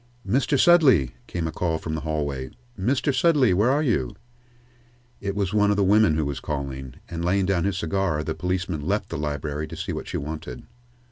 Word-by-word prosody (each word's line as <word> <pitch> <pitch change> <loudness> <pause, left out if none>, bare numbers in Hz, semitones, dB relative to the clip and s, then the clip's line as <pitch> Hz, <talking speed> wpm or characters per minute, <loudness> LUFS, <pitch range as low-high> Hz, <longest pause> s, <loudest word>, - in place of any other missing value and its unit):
"Mr. 130 +6 +1
Sudley!" 130 - +5
came 85 -2 -3
a - - -3
call 80 -2 -1
from 80 0 -5
the 80 - -3
hallway. 70 -4 -3 0.3
"Mr. 130 +8 0
Sudley, 130 - +4
where 105 +7 +3
are 145 +3 +2
you?" 95 - 0 1.0
It 100 -1 -3
was 100 -2 -1
one 105 -1 +3
of 105 - +2
the 100 - +3
women 105 -3 +4
who 80 -1 0
was 70 -1 -3
calling, 65 -3 -5
and, 85 0 -5
laying 95 +2 +2
down 95 -2 +1
his 100 -3 0
cigar, 85 -3 -1
the 80 - -2
policeman 90 -2 -2
left 100 +8 -1
the - - -4
library 75 +1 -3
to - - -9
see - - -4
what - - -5
she - - -3
wanted. 75 -4 -6
90 Hz, 200 wpm, -24 LUFS, 75-105 Hz, 1.0 s, Sudley